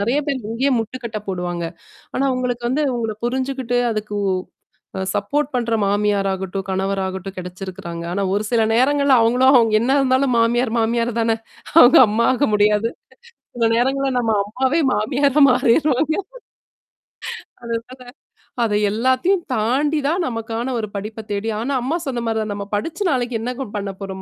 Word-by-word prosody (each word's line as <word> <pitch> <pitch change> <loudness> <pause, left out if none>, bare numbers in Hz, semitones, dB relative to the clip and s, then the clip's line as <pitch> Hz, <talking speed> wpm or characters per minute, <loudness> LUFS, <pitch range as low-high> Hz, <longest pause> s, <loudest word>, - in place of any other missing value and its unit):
நெறைய 240 +8 +1
பேர் 275 -2 -1
இங்கேயே 260 +5 +1
முட்டுக்கட்டை 225 -1 -5
போடுவாங்க. 175 -2 -3 0.5
ஆனா 275 - +1
உங்களுக்கு 245 -1 -2
வந்து 290 +5 +1
உங்கள 225 -2 -2
புரிஞ்சுகிட்டு 260 -1 -1
அதுக்கு 210 -1 -3 0.8
அ - - -2
சப்போர்ட் 285 +8 -1
பண்ற 235 -2 0
மாமியாராகட்டும், 195 -2 0
கணவராகட்டும் 190 0 -2
கிடைச்சிருக்கறாங்க. 180 -2 -7
ஆனா, 200 +2 -1
ஒரு 205 - 0
சில 235 -2 +3
நேரங்கள்ல 280 +3 +3
அவங்களும் 250 +3 +4
அவங்க 225 -2 +4
என்ன 255 +4 +2
இருந்தாலும் 260 0 +2
மாமியார் 230 +1 +2
மாமியார் 230 +1 +1
தான, 225 0 +2 0.5
அவங்க 245 -2 +8
அம்மாக 235 +6 +2
முடியாது. 210 +2 +3 0.7
சில 230 -1 +2
நேரங்கள்ல 270 +3 +1
நம்ம 230 -2 0
அம்மாவே 260 +9 0
மாமியார 275 +7 +2
மாறிருவாங்க. 275 +4 +2 1.5
அதனால, 235 +2 -6 0.6
அத 215 -2 0 0.2
எல்லாத்தையும் 260 - +1
தாண்டி 275 +8 +1
தான் 345 +3 0
நமக்கான 230 +2 -3
ஒரு 215 - -4
படிப்ப 215 +2 -6
தேடி 205 +2 -2
ஆனா, 270 +4 -1
அம்மா 300 +7 0
சொன்ன 240 -3 -2
மாரி 225 -1 0
தான் 210 -1 -4
நம்ம 200 0 -6
படிச்ச 325 - -4
நாளைக்கு 245 -3 -1
என்னங்க 250 +2 -4
பண்ண 200 -1 -4
போறோம்? 190 -1 -6
230 Hz, 140 wpm, -20 LUFS, 210-260 Hz, 1.5 s, அவங்க